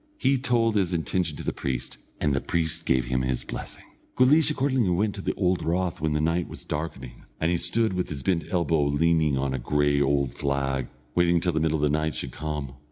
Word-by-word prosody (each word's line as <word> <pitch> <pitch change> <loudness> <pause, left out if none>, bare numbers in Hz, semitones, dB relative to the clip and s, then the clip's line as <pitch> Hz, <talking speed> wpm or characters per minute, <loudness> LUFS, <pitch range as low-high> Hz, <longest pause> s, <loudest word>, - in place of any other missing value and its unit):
He 135 - +2
told 120 -4 +2
his 95 -3 +1
intention 85 -1 -1
to - - -6
the - - -2
priest, 65 -3 -4 0.2
and 75 -2 +1
the 70 - 0
priest 80 -2 -1
gave 65 -2 +2
him 65 +1 0
his 65 -1 -1
blessing. - - -7 0.3
Guleesh 145 +5 +5
accordingly 130 -7 +1
went 100 +4 +1
to 100 - -6
the - - -2
old 90 -2 +1
rath 85 +2 -1
when 80 -1 0
the 75 - +1
night 80 +3 0
was - - -9
darkening, 75 -5 -5
and 80 +2 +1
he 90 - +2
stood 100 +5 0
with 90 0 -2
his 70 -3 -5
bent 90 -3 +1
elbow 85 -4 +1
leaning 75 0 +2
on 65 0 -1
a 65 - -2
grey 70 +3 +2
old 70 -2 +1
flag, 70 -2 -1 0.3
waiting 85 -1 +3
till 85 +1 0
the 80 - +1
middle 80 0 +1
of 75 - -2
the 75 +1 +2
night 80 0 -1
should - - -4
come. 75 -3 -4
80 Hz, 225 wpm, -26 LUFS, 70-90 Hz, 0.3 s, Guleesh